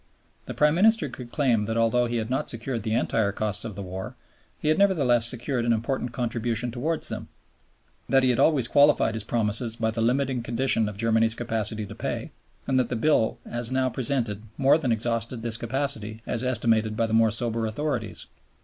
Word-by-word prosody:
The - - -6
Prime 150 0 +4
Minister 220 +6 +3
could 120 -2 -9
claim 120 -8 +1
that 115 +2 -2
although 115 +2 +2
he 120 - -3
had 110 -1 -2
not 130 - 0
secured 115 +1 -2
the 110 +2 -1
entire 110 -3 +1
costs 105 0 -1
of 110 -4 -6
the 100 - -6
war, 95 +1 -6 0.4
he 150 - -2
had 155 - +2
nevertheless 135 - +3
secured 125 +1 -1
an 120 0 +2
important 120 +2 -2
contribution 120 -1 -2
towards 150 +7 -2
them, - - -5 0.8
that 135 -1 +4
he 130 - +4
had 120 - -1
always 140 -7 +3
qualified 140 -4 +4
his 110 -2 -4
promises 115 +1 -1
by 110 -1 -1
the 115 +1 -3
limiting 130 +2 +1
condition 115 -2 0
of 100 - -9
Germany's 115 0 +2
capacity 110 -2 -3
to - - -9
pay, - - -4 0.3
and 130 -1 +1
that 130 - 0
the 125 - -2
bill 120 -1 +2
as 120 0 -3
now 130 0 +1
presented 115 -4 -1 0.2
more 140 +4 +4
than 130 -6 0
exhausted 115 +1 -1
this 115 -2 0
capacity 115 -3 -3
as 120 +1 -3
estimated 115 -3 +1
by 115 - +2
the 110 - -4
more 115 0 +5
sober 115 0 -1
authorities. 120 -2 -3
115 Hz, 195 wpm, -25 LUFS, 110-130 Hz, 0.8 s, more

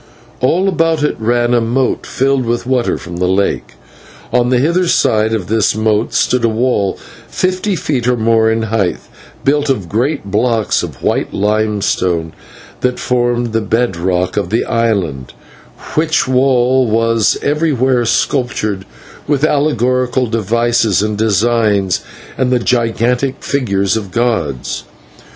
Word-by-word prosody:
All 175 +9 +2
about 165 -4 +1
it 150 - 0
ran 120 +2 +1
a 120 - +3
moat 120 +3 -1
filled 135 0 +1
with 120 +1 -2
water 125 -2 0
from 85 0 -8
the 90 0 0
lake, 95 +2 -1 0.6
and 125 - +3
on 120 - 0
the 125 - +3
hither 170 +7 +1
side 110 -8 +2
of 110 -5 -1
this 110 +2 +1
moat 110 0 0
stood 125 -2 +1
a 115 - +3
wall 110 -4 0 0.3
fifty 185 +2 -1
feet 130 -7 -2
or 125 -1 +2
more 110 0 +3
in 110 0 0
height, 110 -5 0 0.5
built 145 +1 +2
of 105 -10 -1
great 115 - -2
blocks 115 +1 +1
of - - -8
white - - -1
limestone 100 -5 0 0.5
that 125 0 0
formed 120 -2 0
the 115 - +1
bed 115 -1 0
rock 90 +2 -1
of 105 - -1
the 115 - 0
island, 100 - -1 0.6
which 155 -1 +1
wall 130 -1 +2
was 115 0 +2
everywhere 135 -5 +1
sculptured 110 -5 -1 0.4
with 145 -1 0
allegorical 130 -4 +1
devices 115 -1 +1
and 105 0 -1
designs, 105 -3 +1 0.4
and 130 -1 +1
the 125 - +4
gigantic 120 +2 0
figures 100 -8 0
of 105 -4 -4
gods. 95 - -1
115 Hz, 140 wpm, -15 LUFS, 105-130 Hz, 0.6 s, the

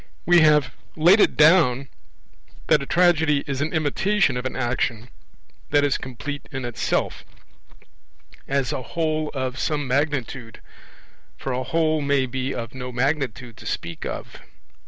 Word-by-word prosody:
We 175 0 +6
have 150 -4 +4 0.2
laid 175 +6 +5
it - - +3
down 150 -5 +5 0.8
that 150 - +3
a 140 - -6
tragedy 160 -5 +3
is 140 -3 -3
an 155 - -1
imitation 160 +1 +1
of 125 +1 -2
an - - -7
action 120 -2 -2 0.6
that 145 - +3
is 145 -2 +1
complete 140 +3 -7
in 135 -2 -4
itself, 120 -1 -2 1.2
as 135 -2 0
a - - -3
whole 155 +3 -2
of 130 -1 -3
some 145 -1 -1
magnitude; 130 -4 -2 0.8
for 135 - -4
a 125 0 -1
whole 155 +3 0
may 140 -2 +1
be 130 +1 -3
of 115 -2 -5
no 125 -1 -6
magnitude 125 -3 -2
to - - -13
speak 85 -1 -4
of. - - -6
140 Hz, 145 wpm, -23 LUFS, 125-155 Hz, 1.2 s, We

